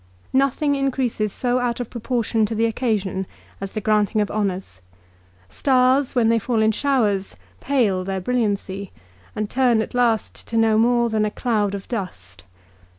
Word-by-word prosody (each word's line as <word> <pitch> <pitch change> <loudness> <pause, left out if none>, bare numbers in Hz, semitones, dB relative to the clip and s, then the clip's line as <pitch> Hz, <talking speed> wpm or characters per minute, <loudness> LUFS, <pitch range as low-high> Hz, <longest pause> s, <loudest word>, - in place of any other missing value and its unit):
Nothing 275 +2 +2
increases 260 -6 -1
so 250 +3 0
out 245 -1 -1
of 245 - -5
proportion 235 -2 -1
to 225 - -4
the 225 +1 +2
occasion 210 -5 -1 0.3
as 195 0 -5
the 215 - -3
granting 215 0 +2
of 210 - 0
honours. 190 - -3 0.7
Stars, 260 - +2
when 235 -3 +3
they 230 0 +3
fall 225 0 0
in 220 - +4
showers, 215 -7 0 0.2
pale 225 -9 +1
their 190 0 -3
brilliancy, 200 -3 -2 0.4
and 215 - -2
turn 245 -1 +2
at 220 - -3
last 235 -3 0
to 230 - -2
no 220 -1 +4
more 235 0 +3
than 215 -1 +1
a 210 - +1
cloud 210 -3 -1
of 195 - -8
dust. 165 - -6
225 Hz, 160 wpm, -22 LUFS, 205-245 Hz, 0.7 s, in